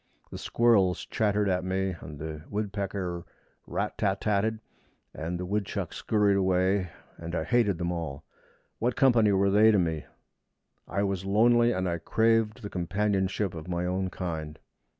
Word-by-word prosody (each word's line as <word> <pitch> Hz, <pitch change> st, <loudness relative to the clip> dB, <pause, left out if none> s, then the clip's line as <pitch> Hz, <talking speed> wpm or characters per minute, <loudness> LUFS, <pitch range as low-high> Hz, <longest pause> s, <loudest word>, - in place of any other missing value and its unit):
The -, -, -6 dB
squirrels 105 Hz, -6 st, +2 dB
chattered 105 Hz, -1 st, +1 dB
at 90 Hz, -1 st, +1 dB
me, 95 Hz, 0 st, -1 dB
and 75 Hz, -, -9 dB
the 75 Hz, 0 st, -6 dB
woodpecker 100 Hz, -4 st, -3 dB, 0.4 s
rat -, -, -3 dB
tat 100 Hz, -1 st, +1 dB
tat 100 Hz, -2 st, +1 dB
ed, 110 Hz, 0 st, -1 dB, 0.5 s
and 85 Hz, +3 st, -4 dB
the 90 Hz, -, -3 dB
woodchucks 100 Hz, +1 st, -3 dB
scurried 105 Hz, -2 st, +2 dB
away, 95 Hz, 0 st, +2 dB, 0.3 s
and 85 Hz, +1 st, -6 dB
I 80 Hz, -, 0 dB
hated 110 Hz, -3 st, +2 dB
them 85 Hz, 0 st, -2 dB
all. 80 Hz, -4 st, -5 dB, 0.6 s
What 120 Hz, +1 st, 0 dB
company 115 Hz, -6 st, +4 dB
were 100 Hz, 0 st, +3 dB
they 105 Hz, +2 st, +6 dB
to 105 Hz, -, +4 dB
me? 80 Hz, -4 st, -1 dB, 0.8 s
I 100 Hz, +2 st, -1 dB
was 95 Hz, -2 st, -1 dB
lonely, 120 Hz, +4 st, +4 dB
and 95 Hz, -4 st, -1 dB
I 85 Hz, -1 st, -1 dB
craved 110 Hz, +4 st, +1 dB
the -, -, -3 dB
companionship 95 Hz, +1 st, 0 dB
of 80 Hz, -1 st, -8 dB
my 90 Hz, 0 st, -2 dB
own 95 Hz, +1 st, -1 dB
kind. 80 Hz, -4 st, -5 dB
95 Hz, 160 wpm, -28 LUFS, 90-105 Hz, 0.8 s, they